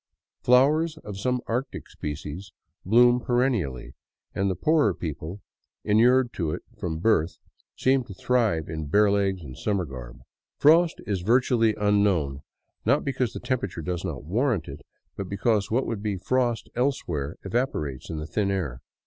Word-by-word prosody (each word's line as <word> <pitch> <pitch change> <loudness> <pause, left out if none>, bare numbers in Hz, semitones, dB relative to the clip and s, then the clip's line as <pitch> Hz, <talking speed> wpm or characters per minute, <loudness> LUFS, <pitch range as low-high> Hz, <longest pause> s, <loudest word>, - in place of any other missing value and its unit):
Flowers 150 +6 +4
— - - -41
of 100 -2 -6
some 125 +3 0
Arctic 125 +4 -3
species 75 +5 -6 0.2
— - - -48
bloom 120 +3 +6
perennially, 120 - -1 0.4
and 95 0 0
the 95 - -1
poorer 145 - +2
people, 80 +4 -6 0.4
inured 120 +4 +4
to 85 -4 -2
it 75 - -4
from 80 -3 -3
birth, 85 -2 +1 0.4
seem 130 0 +2
to 100 - -9
thrive 110 -9 +1
in 80 -2 -5
bare 105 +6 +4
legs 95 -3 0
and 65 -4 -9
summer 100 -4 -1
garb. 65 -2 -9 0.4
Frost 165 +3 +5
is 100 -3 -2
virtually 115 +1 +3
un 105 -1 +2
known, 75 -9 +1 0.4
not 140 +7 +2
because 130 -4 -1
the - - -5
temperature 100 -10 -3
does 90 +2 -3
not 80 -9 -4
warrant 105 - 0
it, 70 +1 -8 0.3
but 95 -2 -5
because 100 +1 +1
what 125 +4 +1
would 110 -3 -3
be 105 -2 -2
frost 120 +2 0
elsewhere 85 - -1
evaporates 95 - -2
in 80 - -4
the 75 - -4
thin 100 +4 -1
air. 80 -11 -2
100 Hz, 165 wpm, -26 LUFS, 80-125 Hz, 0.4 s, bloom